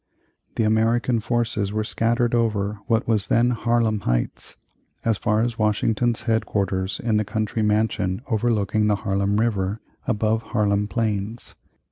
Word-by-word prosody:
The - - +1
American 115 +2 +2
forces 110 -3 -1
were 110 0 -1
scattered 115 +2 0
over 105 -3 0
what 115 0 +1
was 105 -3 +1
then 120 +3 +3
Harlem 115 -2 +1
Heights, - - -2 0.5
as 115 -1 +3
far 105 +1 +1
as 120 0 -2
Washington's 110 +2 +1
head 110 -1 0
quarters 95 -1 -1
in 110 -2 +2
the 105 - +2
country 110 +1 -2
mansion 105 -1 0
overlooking 110 -2 +1
the 105 - +3
Harlem 100 +1 0
River 105 -2 0 0.3
above 110 -1 +1
Harlem 105 -2 0
Plains. 105 +2 -3
110 Hz, 140 wpm, -23 LUFS, 105-115 Hz, 0.5 s, then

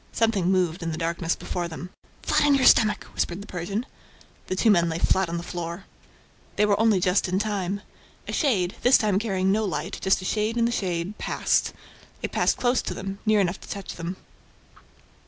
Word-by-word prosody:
Something 215 -6 +1
moved 180 -2 +1
in 165 -1 -2
the 160 - -4
darkness 165 0 -1
before 175 -1 -4
them. 175 +2 -8 0.3
"Flat - - +2
on 285 - +5
your 270 - +2
stomach!" 215 -2 +5
whispered 175 +2 -2
the 200 - -8
Persian. 195 +5 -4 0.6
The 185 - -2
two 220 +3 +4
men 170 -3 +3
lay 160 - -2
flat 190 +1 +2
on 170 - -2
the 170 - -5
floor. 175 +1 -5 0.7
They 210 - +3
were 205 -1 +2
only 220 -3 +4
just 180 +2 +2
in 185 +1 0
time. 200 -2 -2 0.5
A - - -4
shade, 195 - +1
this 250 - +6
time 205 -3 +1
carrying 190 -4 0
no 215 +2 +2
light, 175 -2 -3
just 190 - +3
a 185 - -7
shade 215 +3 0
in 230 - +3
the 235 - +1
shade, 185 -2 -2
passed. - - +1 0.5
It - - -2
passed - - +2
close 250 0 +2
to - - -5
them, 195 +1 -6
near 215 -1 +4
enough 185 0 -1
to - - -12
touch 200 -1 -6
them. 175 +2 -5
190 Hz, 205 wpm, -25 LUFS, 175-210 Hz, 0.7 s, this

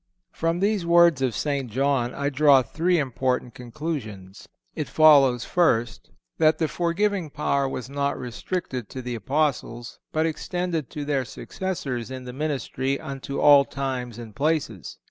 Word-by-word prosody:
From 165 +1 -1
these 205 -2 +1
words 170 -4 +5
of 125 -5 0
St. 140 -4 -2
John 130 0 0
I 140 0 -1
draw 140 -1 +5
three 170 +9 0
important 130 -3 -1
conclusions: 115 - -7 0.2
It - - -4
follows, 140 -6 +5
first, 120 -10 +1 0.3
that 155 0 +4
the 160 - 0
forgiving 175 +1 -1
power 140 -2 0
was 130 -1 -5
not 140 +1 -2
restricted 125 - -5
to 130 - -7
the 125 0 -4
Apostles, 120 -1 -2
but 160 +1 +1
extended 165 -2 -2
to 145 -1 -5
their 140 -2 0
successors 130 -4 -5
in 130 -1 -7
the 125 0 -8
ministry 140 -2 -2
unto 140 -1 -6
all 145 -1 +7
times 130 -4 -4
and 115 -3 -10
places. 140 - -2
140 Hz, 145 wpm, -24 LUFS, 125-155 Hz, 0.3 s, all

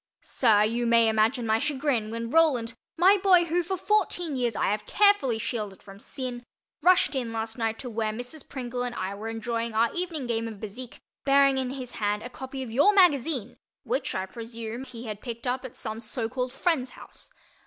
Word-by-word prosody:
Sir, 215 -5 +3
you 235 +2 0
may 230 -1 +5
imagine 220 +3 +2
my 220 0 +2
chagrin 270 -6 0
when 230 +1 -4
my - - -4
Roland—my 320 - +3
boy 370 -3 +5
who, 345 +2 +1
for 375 +2 -3
fourteen 355 -6 0
years, 240 -4 0
I - - +1
have 210 0 -3
carefully 405 - +4
shielded 215 -4 -4
from 195 0 -12
sin—rushed 255 - -1
in 250 -4 -2
last 225 +1 -4
night 225 -1 0
to 255 - -7
where 220 -1 -1
Mrs. 245 +7 -7
Pringle 250 -2 -4
and 245 -1 -3
I 190 -1 -3
were 210 +2 -6
enjoying 230 0 -3
our 230 +1 +2
evening 340 -6 -3
game 230 -1 -1
of 225 - -6
Bézique, 220 +4 -8 0.3
bearing 275 -1 +4
in 260 -1 -2
his 255 -2 -6
hand 210 0 -1
a 245 - -7
copy 265 +1 -6
of 240 - -7
your 290 - +4
magazine 300 - +3 0.3
which, - - -2
I 190 - -1
presume, 230 +3 -7
he 245 -2 -9
had 210 -2 -6
picked 235 -1 -6
up 255 +1 -1
at 260 - -8
some 220 -1 -5
so 230 +1 -3
called 250 +2 -3
friend's 270 -2 0
house. - - -12
245 Hz, 195 wpm, -27 LUFS, 225-275 Hz, 0.3 s, may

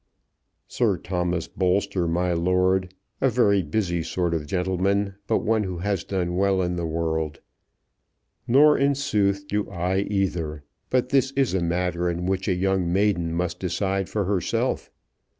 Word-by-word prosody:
"Sir - - +1
Thomas 90 -2 -2
Bolster, 95 -1 0
my 90 +2 0
lord; 90 +2 +1 0.3
a 135 - +4
very 105 -6 +3
busy 85 +1 -1
sort 85 +1 -1
of 75 -3 -2
gentleman, 95 +3 0
but - - +1
one 110 0 +2
who 95 -3 -4
has 100 0 -1
done 90 -3 -2
well 95 0 +2
in 90 0 -1
the 85 -1 -2
world. 80 -2 -2 1.1
Nor 145 +5 +6
in 140 +1 +3
sooth 100 -8 0
do 105 +1 -1
I 90 0 -1
either; 90 -7 -2 0.3
but 125 0 +1
this 135 -1 +3
is 135 -5 +1
a 95 - +1
matter 90 +1 0
in 85 +1 -3
which 95 0 -1
a 95 - +2
young 95 -1 0
maiden 95 -3 +1
must 90 +1 -2
decide 95 +1 -1
for 105 -3 -1
herself. 95 -3 -1
95 Hz, 155 wpm, -24 LUFS, 85-100 Hz, 1.1 s, Nor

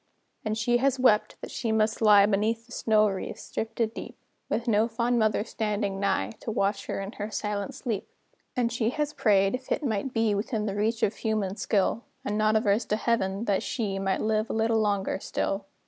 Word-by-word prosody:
And 215 0 -1
she 240 +2 +2
has 265 +1 +1
wept, 215 -5 +3
that - - -7
she 230 -2 -2
must 220 0 +1
lie 205 -2 +7
Beneath 220 +3 0
the 240 - -20
snow 215 -3 +3
wreaths, 195 -2 -5
drifted 225 0 -2
deep, - - -8 0.3
With 235 +2 -1
no 220 0 +3
fond 235 +1 0
mother 215 -1 +2
standing 210 -3 -2
nigh, 110 - 0
To - - -6
watch 200 -2 0
her - - -2
in 195 +1 -5
her 210 -1 -5
silent 205 -2 -3
sleep. 220 -6 -4 0.5
And 240 -2 +1
she 230 -1 0
has 295 +3 -2
prayed, 195 -6 +3
if 255 +1 -5
it 300 - 0
might 225 +2 -1
be 225 -3 +2
Within 210 +1 -1
the 200 - -2
reach 225 +3 0
of 205 - +1
human 215 -4 -1
skill, 215 +2 0 0.2
And 205 - -1
not 215 0 +2
averse 220 +1 +2
to 210 - 0
Heaven, 215 -2 0
that 200 -3 +1
she 200 -6 -2
Might 195 -1 0
live 215 0 0
a - - -2
little 225 0 +2
longer 200 -3 0
still. 195 0 -2
215 Hz, 205 wpm, -27 LUFS, 205-230 Hz, 0.5 s, lie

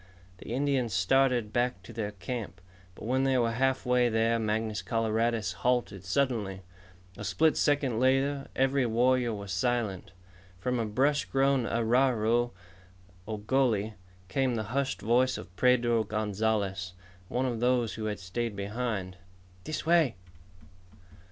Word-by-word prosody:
The - - -9
Indians 130 -4 0
started 120 +3 +2
back 120 -6 0
to 115 - -11
their 110 -2 -3
camp. 95 -2 -6 0.4
But - - -9
when 130 +3 +1
they 135 -1 +2
were 115 -2 +2
halfway 125 0 +2
there 115 +1 +2
Mangus 110 -1 -1
Coloradus 115 -3 0
halted 120 -6 0
suddenly. 100 -3 -1 0.6
A - - -5
split 155 +11 +2
second 140 -6 +1
later, 135 +2 +2
every 135 -1 +2
warrior 120 +1 +2
was 100 -3 -3
alert. 120 -7 -1 0.5
From 125 +7 -1
a 115 - -1
brush 135 +7 +1
grown 135 -2 +2
arroyo, 120 0 +2 0.8
or 110 -1 -3
gully, 110 -3 +1 0.3
came 125 +6 0
the 110 - -1
hushed 140 0 -1
voice 125 +3 +2
of 90 - -11
Pedro 120 -2 +3
Gonzalez, 105 -3 -1 0.3
one 125 +6 -1
of 120 -3 -2
those 120 -2 +1
who 110 - -5
had 105 -1 -3
stayed 105 +4 -3
behind. 100 -2 -3 0.5
"This 155 -1 -4
way." 165 - +3
115 Hz, 135 wpm, -29 LUFS, 105-130 Hz, 0.8 s, Pedro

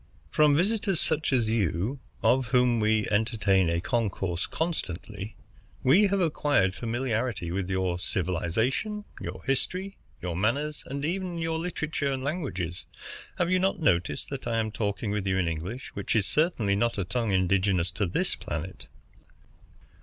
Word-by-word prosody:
"From 150 -2 +5
visitors 200 0 +2
such 155 -1 +1
as 120 -4 +2
you, 110 - 0 0.2
of 130 -1 +3
whom 125 -1 +3
we 110 0 +2
entertain 105 -4 +3
a 85 0 +1
concourse 95 -4 -1
constantly, 110 - -4 0.5
we 180 +11 +6
have 200 0 +1
acquired 145 - +2
familiarity 115 -4 -2
with 95 +1 -2
your 95 -2 0
civilization, 110 - -1 0.2
your 90 +1 -6
history, 185 +8 -2 0.2
your 90 -2 -3
manners, 140 - 0
and 140 +2 -3
even 180 +1 -2
your 165 -1 -1
literature 155 -4 -2
and 130 -1 -2
languages. 125 - -3 0.5
Have 175 0 +1
you 185 - +4
not 190 +1 +1
noticed 90 - +1
that 135 -3 -5
I 115 -1 0
am 110 -1 -1
talking 100 0 -2
with 105 -2 -1
you 95 -1 +2
in 90 -2 +1
English, 85 +10 -4
which 100 - -2
is 105 -3 +3
certainly 125 - +2
not 115 +2 +1
a 100 - 0
tongue 115 +3 -1
indigenous 95 -1 +2
to 95 +2 -1
this 85 - 0
planet?" 80 +5 -6
115 Hz, 155 wpm, -28 LUFS, 95-150 Hz, 0.5 s, we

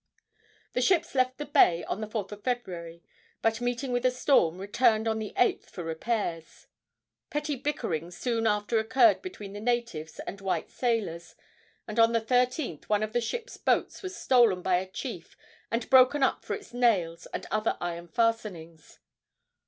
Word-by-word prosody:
The 250 - 0
ships 340 +4 +2
left 255 -1 +1
the 295 - -4
bay 225 - +4
on 210 - -4
the 215 - -3
4th 210 -2 -4
of 210 0 -9
February, 170 -9 -4 0.4
but, 225 +1 +1
meeting 245 +2 -2
with 245 0 0
a 255 - +5
storm, 250 - +2
returned 215 +3 +2
on 220 0 0
the 215 -1 -5
8th 245 - +2
for 175 - -7
repairs. 165 0 -3 0.6
Petty 295 0 -2
bickerings 180 - -3
soon 230 -2 0
after 210 +2 +1
occurred 260 +9 +4
between 210 - -8
the 205 - -6
natives 235 -9 -2
and 200 - -7
white 195 -1 -2
sailors, 215 -9 -2 0.5
and 215 +1 -3
on 230 0 +5
the 230 - +3
13th 250 - 0
one 210 0 +1
of 215 0 -4
the 240 - +2
ships' 475 - -5
boats - - 0
was 375 -3 -6
stolen 230 -8 +4
by 185 -1 +3
a 185 +1 -4
chief - - -7 0.3
and 230 0 -2
broken 260 +2 +6
up - - +1
for - - -3
its 405 - -12
nails 200 -9 +1
and - - -5
other 215 +1 0
iron 170 0 -4
fastenings. 210 -9 -2
225 Hz, 170 wpm, -28 LUFS, 185-250 Hz, 0.6 s, broken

